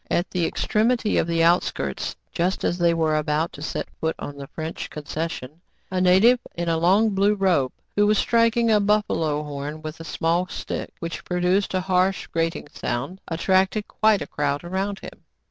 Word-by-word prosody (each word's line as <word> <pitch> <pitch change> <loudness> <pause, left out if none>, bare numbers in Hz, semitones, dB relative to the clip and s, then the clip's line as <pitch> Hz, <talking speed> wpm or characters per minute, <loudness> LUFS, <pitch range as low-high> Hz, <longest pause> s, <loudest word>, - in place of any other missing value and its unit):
At 175 - 0
the 175 -3 +1
extremity 225 0 +1
of - - 0
the 165 -1 +2
outskirts, 165 - +1 0.2
just 180 +3 -1
as 175 - 0
they 170 -1 +4
were 160 -2 +1
about 155 +2 0
to 145 - -10
set 155 - -3
foot 160 0 -1
on 145 - -7
the 140 -1 -8
French 160 +2 -6
concession, 155 0 -5 0.3
a 185 -1 0
native 190 +7 +5 0.2
in 170 0 -3
a 165 -1 +2
long 200 +6 +4
blue 200 +2 +3
robe, 180 -10 +2 0.2
who 205 0 +4
was 210 0 +3
striking 230 +1 +3
a 210 - +5
buf 210 +1 +2
falo 150 -2 -1
horn 150 +2 -6
with 155 +1 -6
a - - -7
small 165 +3 0
stick, - - -5
which 170 0 -5
produced 180 +2 +1
a 185 - +1
harsh, 185 +1 +1
grating 165 -1 -2
sound, 140 +11 -4
attracted 190 +5 +1
quite 215 -2 +2
a - - -7
crowd 145 0 -2
around 190 +3 -2
him. - - -11
175 Hz, 185 wpm, -24 LUFS, 160-195 Hz, 0.3 s, native